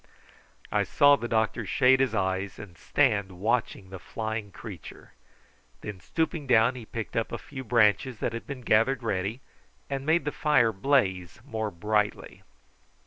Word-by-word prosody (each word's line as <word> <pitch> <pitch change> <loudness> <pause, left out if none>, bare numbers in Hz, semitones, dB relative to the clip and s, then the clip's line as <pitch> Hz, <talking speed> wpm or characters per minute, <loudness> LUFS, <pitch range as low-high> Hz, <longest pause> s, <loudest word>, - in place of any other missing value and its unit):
I - - +2
saw 145 0 +5
the 120 - -5
doctor 110 -2 0
shade 130 -1 +4
his 135 -4 +1
eyes 95 0 -1
and 90 -4 -11
stand 100 -3 +1
watching 100 -1 -2
the 95 - -7
flying 110 +2 -4
creature. 95 -6 -11 0.7
Then 105 -3 -7
stooping 160 - -2
down 120 0 +4
he 120 -4 -10
picked 115 -2 -6
up 115 - -1
a - - -3
few 140 -4 -9
branches 115 +1 +2
that 115 - -2
had 115 - -6
been 140 -3 -6
gathered 120 +3 +2
ready, 105 +3 -2 0.5
and 135 -1 -2
made 160 0 +2
the 150 - -1
fire 140 -7 +3
blaze 95 - 0
more 110 -5 -3
brightly. 105 +3 -2
115 Hz, 155 wpm, -27 LUFS, 100-130 Hz, 0.7 s, saw